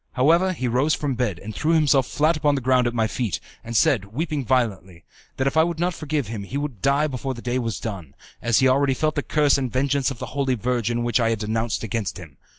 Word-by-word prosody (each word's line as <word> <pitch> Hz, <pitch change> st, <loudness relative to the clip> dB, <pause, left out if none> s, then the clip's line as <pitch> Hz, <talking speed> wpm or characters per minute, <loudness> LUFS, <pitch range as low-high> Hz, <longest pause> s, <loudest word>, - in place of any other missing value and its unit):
However, 165 Hz, +8 st, +3 dB
he 130 Hz, -7 st, -3 dB
rose 130 Hz, +6 st, +2 dB
from 145 Hz, -2 st, -2 dB
his 125 Hz, -, -3 dB
bed, 110 Hz, -9 st, 0 dB
and 110 Hz, +5 st, -8 dB
threw 155 Hz, +7 st, 0 dB
himself 145 Hz, -5 st, +3 dB
flat 155 Hz, +3 st, +2 dB
upon 145 Hz, -1 st, +2 dB
the 135 Hz, -, -2 dB
ground 125 Hz, 0 st, +3 dB
at 120 Hz, -, -2 dB
my 110 Hz, -1 st, +2 dB
feet, 105 Hz, -, -2 dB, 0.2 s
and 115 Hz, 0 st, -2 dB
said, 105 Hz, -5 st, +3 dB
weeping 145 Hz, +7 st, -3 dB
violently, 100 Hz, -9 st, -1 dB, 0.3 s
that 135 Hz, -, 0 dB
if 135 Hz, -, 0 dB
I 160 Hz, -, +6 dB
would 170 Hz, -1 st, -2 dB
not 175 Hz, +1 st, +1 dB
forgive 155 Hz, -3 st, -2 dB
him 110 Hz, -1 st, -5 dB
he 100 Hz, +8 st, -5 dB
would 140 Hz, -8 st, -4 dB
die 140 Hz, +2 st, +3 dB
before 135 Hz, -2 st, -3 dB
the 120 Hz, -, -9 dB
day 125 Hz, +1 st, -1 dB
was 115 Hz, -8 st, -3 dB
done, 90 Hz, -, -6 dB, 0.3 s
as 115 Hz, -2 st, +2 dB
he 130 Hz, -, +4 dB
already 135 Hz, +1 st, +3 dB
felt 155 Hz, +3 st, 0 dB
the 145 Hz, -, -1 dB
curse 145 Hz, -1 st, +2 dB
and 130 Hz, -2 st, -2 dB
the -, -, -2 dB
vengeance 140 Hz, +1 st, +1 dB
of 135 Hz, -, -6 dB
the -, -, -7 dB
Holy 135 Hz, -2 st, 0 dB
Virgin 120 Hz, 0 st, -1 dB
which 120 Hz, 0 st, +1 dB
I 115 Hz, -1 st, +2 dB
had 115 Hz, -, 0 dB
denounced 110 Hz, +2 st, -2 dB
against 110 Hz, -3 st, -3 dB
him. 80 Hz, -6 st, -12 dB
130 Hz, 255 wpm, -23 LUFS, 115-145 Hz, 0.3 s, I